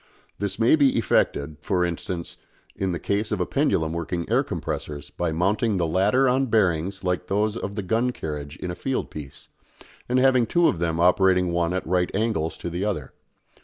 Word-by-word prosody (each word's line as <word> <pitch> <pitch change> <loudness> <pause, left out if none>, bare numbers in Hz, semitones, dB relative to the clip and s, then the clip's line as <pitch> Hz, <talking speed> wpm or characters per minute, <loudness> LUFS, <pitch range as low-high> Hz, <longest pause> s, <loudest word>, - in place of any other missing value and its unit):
This 100 -1 -2
may 115 +6 +5
be 140 -5 +3
effected, 80 -7 +1
for 90 +2 +1
instance, 85 0 -5 0.4
in 95 -1 -1
the 85 - -2
case 100 +7 -1
of 105 - -1
a 90 - +1
pendulum 85 - +1
working 85 +1 -3
air - - +4
compressors, 75 -2 -5
by 85 -2 -2
mounting 100 +6 +1
the 85 - +1
latter 95 +11 +3
on 130 +2 +2
bearings 95 -3 +1
like 90 0 -1
those 105 +2 0
of 100 -3 -5
the 105 - -3
gun 115 +6 +1
carriage 75 -9 -6
in 90 - -4
a - - -5
field 135 +6 -3
piece, 75 +2 -9 0.6
and 125 - +2
having 130 -2 +4
two 170 +5 +3
of 85 - 0
them 85 -1 -1
operating 90 0 +4
one 85 0 0
at 95 0 -2
right 90 +1 +1
angles 100 -7 -1
to - - -5
the 90 +3 -2
other. 95 -10 -3
90 Hz, 195 wpm, -24 LUFS, 85-110 Hz, 0.6 s, may